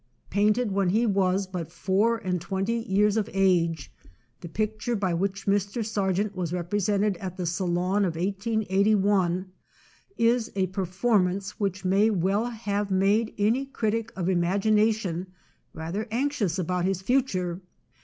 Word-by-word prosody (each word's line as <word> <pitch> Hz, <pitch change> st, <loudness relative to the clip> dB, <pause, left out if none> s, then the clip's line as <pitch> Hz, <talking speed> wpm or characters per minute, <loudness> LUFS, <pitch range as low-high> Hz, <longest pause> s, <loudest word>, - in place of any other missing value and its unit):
Painted 210 Hz, +3 st, +2 dB
when 195 Hz, -1 st, +1 dB
he 220 Hz, +6 st, +2 dB
was 195 Hz, -2 st, +1 dB
but 180 Hz, -3 st, -6 dB
four 200 Hz, +6 st, +1 dB
and 180 Hz, -4 st, -2 dB
twenty 195 Hz, +5 st, -1 dB
years 205 Hz, +2 st, +3 dB
of 215 Hz, -, -1 dB
age, 175 Hz, -5 st, +1 dB, 0.5 s
the 170 Hz, -, -8 dB
picture 215 Hz, +5 st, -2 dB
by 190 Hz, -4 st, 0 dB
which 195 Hz, +3 st, -2 dB
Mr. 200 Hz, +3 st, 0 dB
Sargent 200 Hz, -1 st, -1 dB
was 175 Hz, -3 st, -3 dB
represented 200 Hz, +3 st, 0 dB
at 185 Hz, 0 st, -6 dB
the 180 Hz, -, -3 dB
Salon 180 Hz, +3 st, 0 dB
of 175 Hz, -4 st, -1 dB
1881 195 Hz, -1 st, +1 dB, 0.7 s
is 230 Hz, 0 st, +2 dB
a 190 Hz, -1 st, +2 dB
performance 195 Hz, 0 st, 0 dB
which 195 Hz, -2 st, -2 dB
may 200 Hz, +4 st, +4 dB
well 200 Hz, +2 st, +1 dB
have 210 Hz, -3 st, -2 dB
made 200 Hz, +4 st, +2 dB
any 220 Hz, +6 st, +2 dB
critic 225 Hz, -3 st, -2 dB
of 180 Hz, -2 st, -2 dB
imagination 195 Hz, 0 st, +1 dB, 0.4 s
rather 170 Hz, +8 st, -4 dB
anxious 235 Hz, -, -1 dB
about 180 Hz, 0 st, -1 dB
his 190 Hz, 0 st, -1 dB
future. 190 Hz, -7 st, 0 dB
195 Hz, 135 wpm, -26 LUFS, 185-215 Hz, 0.7 s, may